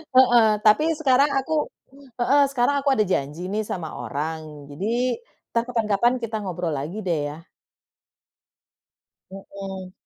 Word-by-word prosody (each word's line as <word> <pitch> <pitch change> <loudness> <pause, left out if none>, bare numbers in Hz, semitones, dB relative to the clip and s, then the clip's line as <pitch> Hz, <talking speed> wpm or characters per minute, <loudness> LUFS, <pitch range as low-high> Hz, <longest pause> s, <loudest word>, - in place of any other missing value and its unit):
Heeh, 240 -3 +7 0.2
tapi 220 +9 +5
sekarang 275 -1 +4
aku 300 +3 0 0.5
heeh, 280 +4 +4
sekarang 275 +1 +2
aku 280 - +2
ada 215 - +2
janji 160 0 -2
nih 210 +3 -1
sama 165 -4 -4
orang 150 +4 -5
jadi, 230 - -1 0.4
entar 230 - +3
kapan-kapan 230 0 +2
kita 230 -2 -4
ngobrol 175 -4 -3
lagi 150 +9 -4
deh 165 -4 +1
ya. 165 +2 -15 1.8
Mhm. 195 -1 -8
205 Hz, 125 wpm, -24 LUFS, 165-245 Hz, 1.8 s, Heeh